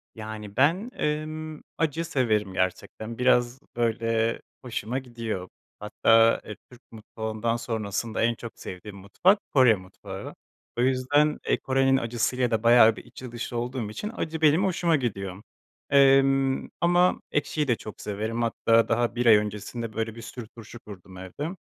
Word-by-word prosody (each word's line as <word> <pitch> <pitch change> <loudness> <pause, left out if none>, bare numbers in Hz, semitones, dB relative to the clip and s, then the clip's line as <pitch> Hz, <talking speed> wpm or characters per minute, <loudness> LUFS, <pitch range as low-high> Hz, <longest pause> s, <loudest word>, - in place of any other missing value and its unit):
Yani, 110 -1 -8
ben, 175 - +2
ımm, 155 +1 -3
acı 165 +1 -1
severim 110 - 0
gerçekten, 110 +5 -3
biraz, 125 0 +2 0.2
böyle, 115 -1 0 0.2
hoşuma 125 +1 -3
gidiyor. 115 -7 -5 0.3
Hatta, 115 +2 +3
eee, 105 - -7 0.2
Türk 125 +1 -16
mutfağından 110 +1 -3
sonrasında 115 -1 -3
en 120 0 +2
çok 115 0 -8
sevdiğim 100 +2 -8
mutfak 140 - +2
Kore 130 -5 +6
mutfağı. 95 0 -9 0.4
O - - +1
yüzden, 135 +4 +2
eee, - - +2
Kore'nin 135 0 +2
acısı 115 0 -1
ile 125 -2 0
de 110 -1 0
bayağı 115 -1 +7
bir - - -11
içli 120 0 -10
dışlı 120 0 -5
olduğum 120 -2 -3
için 210 - -5
acı 160 0 -4
benim 160 +5 +4
hoşuma 170 -3 +1
gidiyor, 100 -8 -3 0.5
emm, 135 -1 +4
ama 175 +1 +3
ekşiyi 145 +1 -1
de 120 - +3
çok 110 -1 -10
severim, 110 +3 -3
hatta 115 0 +2
daha 120 +1 0
1 125 - -1
ay 115 -2 +8
öncesinde, 105 +2 -4
böyle, 110 0 -3
bir 115 - -9
sürü 115 0 -8
turşu 115 +1 -12
kurdum 95 -3 -12
evde. 145 - -6
120 Hz, 150 wpm, -26 LUFS, 110-135 Hz, 0.5 s, ay